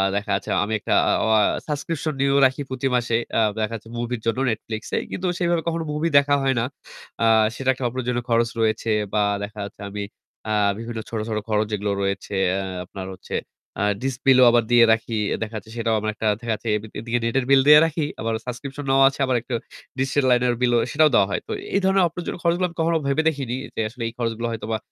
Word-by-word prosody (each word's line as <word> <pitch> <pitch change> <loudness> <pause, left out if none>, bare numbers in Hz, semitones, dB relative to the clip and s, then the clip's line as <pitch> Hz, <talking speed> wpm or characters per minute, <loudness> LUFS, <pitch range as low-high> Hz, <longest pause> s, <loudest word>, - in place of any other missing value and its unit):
দেখা 100 +1 -2
যাচ্ছে - - -4
আমি 110 +2 -3
একটা - - -1 0.2
আ - - +4
অয়া 110 -1 +4 0.3
subscription 155 +1 -3
নিয়েও 140 0 +3
রাখি 130 +2 +1
প্রতি 130 0 -2
মাসে 120 -1 0 0.2
আ - - +4 0.2
দেখা 110 +1 -1
যাচ্ছে 115 0 -10
মুভির 120 -1 -3
জন্য 115 +3 0
Netflix 110 0 -5 0.2
এ। - - +2
কিন্তু 185 0 -3
সেইভাবে 175 -1 +1
কখনো 165 0 -1
মুভি 155 +3 0
দেখা 145 0 +4
হয় 135 -1 +2
না। 115 - 0 0.6
আ - - +4 0.3
সেটা 135 -1 -2
একটা 130 - -8
অপ্রয়োজনীয় 120 0 -2
খরচ 115 0 +2
রয়েছে 110 0 0 0.2
বা 105 - +2 0.2
দেখা 105 +1 -7
যাচ্ছে 100 - -12
আমি 105 0 -4 0.5
আ - - 0 0.3
বিভিন্ন 115 0 -5
ছোট, 115 - -3
ছোট 110 - -1
খরচ 105 0 +2
যেগুলো 105 -1 -1
রয়েছে 100 +1 -2 0.2
অ্যা - - 0 0.3
আপনার 95 +1 -8
হচ্ছে - - -7 0.5
আ - - +2 0.2
ডিশ 135 0 -1
বিলও 130 -1 +7
আবার 120 -1 +3
দিয়ে 120 -1 +7
রাখি। 115 0 -2 0.2
এ - - 0
দেখা 110 0 -7
যাচ্ছে 110 +1 -10
সেটাও 115 -1 +1
আমার 110 +1 -2
একটা 110 +1 -3
দেখা 115 -1 -2
যাচ্ছে 115 - -6
এবি 110 - -9
এদিকে 120 +1 -1
নেটের 125 +2 0
বিল 135 -1 +6
দিয়ে 150 0 +10
রাখি 160 -1 -1 0.2
আবার 115 0 -1
subscription 135 +3 -6
নেওয়া 135 0 +5
আছে 135 - -11
আবার 130 -1 0
একটু 125 -1 -4 0.4
ডিশের 135 +1 +1
লাইনের 125 -1 +3
বিলও 120 -1 +3
সেটাও 155 +1 +4
দেওয়া 95 - +5
হয়। - - -1
তো - - -6 0.2
এই - - +4
ধরনের 190 0 +4
অপ্রয়োজনীয় 175 +1 -6
খরচগুলা 175 +2 +2
আমি 170 - -17
কখনো 165 0 +2
ভেবে 140 +3 +2
দেখিনি 135 -5 -4 0.2
যে - - -1
আসলে 120 +1 -7
এই 115 - -6
খরচগুলো 115 -1 -2
হয়তোবা 110 0 -3
120 Hz, 220 wpm, -23 LUFS, 110-140 Hz, 0.6 s, দিয়ে